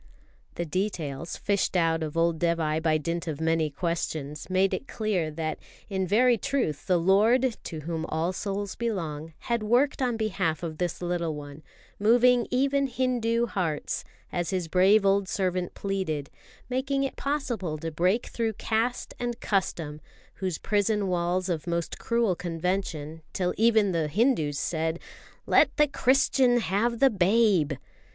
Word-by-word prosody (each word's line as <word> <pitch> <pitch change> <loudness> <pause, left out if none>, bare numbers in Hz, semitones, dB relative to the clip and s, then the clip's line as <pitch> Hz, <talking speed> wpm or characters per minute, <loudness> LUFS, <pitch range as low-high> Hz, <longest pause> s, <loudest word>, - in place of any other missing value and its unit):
The 170 - -2
details, 165 -3 -3
fished 200 -2 0
out 165 -1 +2
of 155 -1 -4
Dévai 165 -1 +1
by 160 -1 +2
dint 170 +3 -3
of 155 -2 -3
many 160 -1 +1
questions, 155 -2 -3
made 190 +1 +2
it 275 - -3
clear 200 -8 -1
that 155 0 -3 0.3
in 190 -1 -1
very 235 +4 +4
truth 270 - -1
the 180 - +4
Lord, 220 +8 +3
to 160 -2 -5
whom 160 +1 -3
all 165 +3 -1
souls 200 +1 -3
belong, 165 -9 -3
had 235 -1 -1
worked 245 +7 +2
on 245 -3 +1
behalf 185 -7 -1
of 160 -2 -5
this 180 0 -2
little 170 -3 -1
one; 145 0 -9 0.4
moving 240 +3 +4
even 275 +2 +2
Hindu 240 -3 0
hearts, 170 -9 -2 0.3
as 175 -1 -2
His 185 -3 -1
brave 195 +5 +4
old 195 -1 +2
servant 185 -2 -1
pleaded, 185 -8 -3 0.4
making 270 +2 0
it 270 - -3
possible 245 - -2
to 165 +2 -5
break 180 +9 +1
through 225 -2 -2
caste 225 +4 -1
and 240 -1 -3
custom, 165 -6 -2 0.4
those 185 -4 -1
prison 205 -1 0
walls 180 +1 0
of 170 -2 -2
most 170 -1 -2
cruel 230 -5 +1
convention, 165 -2 -3
till 180 -1 0
even 220 -3 +4
the 165 -3 0
Hindus 160 - +1
said: 160 +1 -1 0.5
"Let - - +4
the 300 - +5
Christian 260 -2 +3
have 230 +3 0
the 270 -1 +5
babe!" 195 -5 +3
185 Hz, 150 wpm, -27 LUFS, 165-230 Hz, 0.5 s, the